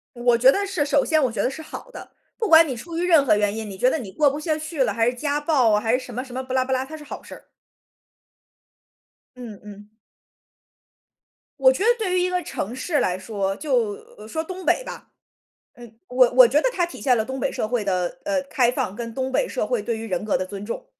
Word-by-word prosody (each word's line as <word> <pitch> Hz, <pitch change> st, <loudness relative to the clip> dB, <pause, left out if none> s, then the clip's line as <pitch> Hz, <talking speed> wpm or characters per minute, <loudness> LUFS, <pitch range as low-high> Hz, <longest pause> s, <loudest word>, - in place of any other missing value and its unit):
我 240 Hz, 0 st, +2 dB
觉 255 Hz, +3 st, +6 dB
得 400 Hz, +5 st, -1 dB
是 365 Hz, -7 st, -1 dB
首 285 Hz, -1 st, +2 dB
先 310 Hz, -3 st, +2 dB
我 250 Hz, -, +1 dB
觉 -, -, -2 dB
得 -, -, +1 dB
是 315 Hz, -, -8 dB
好 315 Hz, +10 st, -10 dB
的， -, -, -11 dB, 0.3 s
不 450 Hz, -, -1 dB
管 325 Hz, 0 st, +8 dB
你 260 Hz, -, -3 dB
出 330 Hz, +8 st, -7 dB
于 345 Hz, -, -1 dB
任 320 Hz, -5 st, +5 dB
何 230 Hz, -, +4 dB
原 205 Hz, 0 st, 0 dB
因， 220 Hz, -1 st, -5 dB
你 195 Hz, -, -8 dB
觉 250 Hz, +6 st, +3 dB
得 -, -, 0 dB
你 220 Hz, -10 st, -7 dB
过 290 Hz, +6 st, +3 dB
不 285 Hz, -, -4 dB
下 310 Hz, 0 st, -1 dB
去 310 Hz, -2 st, -2 dB
了， -, -, 0 dB
还 225 Hz, 0 st, +1 dB
是 245 Hz, -, +1 dB
家 290 Hz, +3 st, -2 dB
暴 285 Hz, -7 st, +2 dB
啊， 210 Hz, -, +3 dB
还 225 Hz, +3 st, +1 dB
是 -, -, -5 dB
什 245 Hz, -, -10 dB
么 250 Hz, -, -3 dB
什 255 Hz, -, -12 dB
么 260 Hz, +1 st, -4 dB
不 255 Hz, -, -10 dB
拉 260 Hz, -1 st, +2 dB
不 265 Hz, -, -5 dB
拉 260 Hz, -, 0 dB
它 315 Hz, +3 st, -9 dB
是 300 Hz, -, -12 dB
好 -, -, -8 dB
事 -, -, -11 dB
儿。 -, -, -13 dB, 1.9 s
嗯 235 Hz, -5 st, -9 dB
嗯。 205 Hz, 0 st, -12 dB, 1.7 s
我 260 Hz, -1 st, +6 dB
觉 320 Hz, -, -2 dB
得 455 Hz, -, +4 dB
对 375 Hz, -5 st, -1 dB
于 -, -, +2 dB
一 365 Hz, -, +1 dB
个 360 Hz, 0 st, -1 dB
城 235 Hz, -, -5 dB
市 295 Hz, +3 st, -1 dB
来 180 Hz, 0 st, 0 dB
说， 195 Hz, -1 st, -3 dB
就 250 Hz, -5 st, 0 dB, 0.3 s
呃， 210 Hz, -, -11 dB
说 320 Hz, +8 st, -3 dB
东 370 Hz, +2 st, -8 dB
北 -, -, +2 dB
吧， -, -, -10 dB, 0.6 s
呃， 240 Hz, -1 st, -12 dB, 0.2 s
我 250 Hz, -1 st, +4 dB
我 250 Hz, -1 st, +8 dB
觉 290 Hz, +5 st, +3 dB
得 -, -, +2 dB
它 355 Hz, -7 st, +1 dB
体 345 Hz, -, -8 dB
现 255 Hz, -3 st, +3 dB
了 220 Hz, -, 0 dB
东 265 Hz, +2 st, -5 dB
北 -, -, -1 dB
社 -, -, -2 dB
会 240 Hz, -3 st, -1 dB
的， 180 Hz, -3 st, -1 dB
呃， 295 Hz, -2 st, 0 dB
开 250 Hz, -3 st, +2 dB
放 195 Hz, -5 st, -2 dB
跟 230 Hz, -1 st, -6 dB
东 260 Hz, +1 st, -2 dB
北 375 Hz, -, +1 dB
社 -, -, -2 dB
会 -, -, -1 dB
对 230 Hz, -2 st, -2 dB
于 225 Hz, -, -7 dB
人 185 Hz, 0 st, -3 dB
格 215 Hz, -, +1 dB
的 -, -, -2 dB
尊 195 Hz, +2 st, -8 dB
重。 -, -, -6 dB
260 Hz, 280 characters per minute, -23 LUFS, 225-310 Hz, 1.9 s, 管